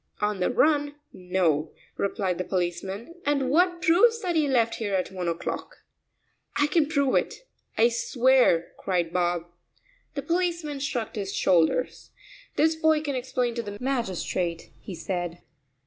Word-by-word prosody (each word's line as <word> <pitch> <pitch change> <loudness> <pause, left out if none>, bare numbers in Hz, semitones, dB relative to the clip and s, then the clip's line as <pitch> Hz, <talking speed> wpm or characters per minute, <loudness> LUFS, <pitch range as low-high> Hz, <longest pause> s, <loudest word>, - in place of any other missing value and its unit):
"On 210 -1 -1
the 180 - +1
run, 290 +2 +2 0.2
no," 175 -5 0 0.2
replied 195 -3 -1
the - - 0
policeman, 190 - -3
"and 280 -2 +1
what 350 +2 +2
proves 455 +8 +5
that 350 -2 -1
he 310 -2 +3
left 235 -4 +2
here 205 -3 -1
at 185 0 -1
one 180 -2 -4
o'clock?" 170 0 -4 0.7
"I 290 - +3
can 300 0 +2
prove 280 -3 +1
it; - - -1 0.3
I 230 +2 +5
swear 245 -3 +3
it," 165 - -12
cried 175 -3 -1
Bob. 175 -1 0 0.7
The 280 - -3
policeman 335 -4 -1
shrugged 250 -6 -3
his 195 -1 -3
shoulders. 175 +8 +1 0.5
"This 320 +1 +3
boy 315 -1 +3
can 290 -2 -3
explain 250 -1 -1
to 235 - -2
the 205 -2 -7
magistrate," 190 -9 -2
he 190 - -8
said. 175 0 -4
235 Hz, 150 wpm, -26 LUFS, 180-290 Hz, 0.7 s, proves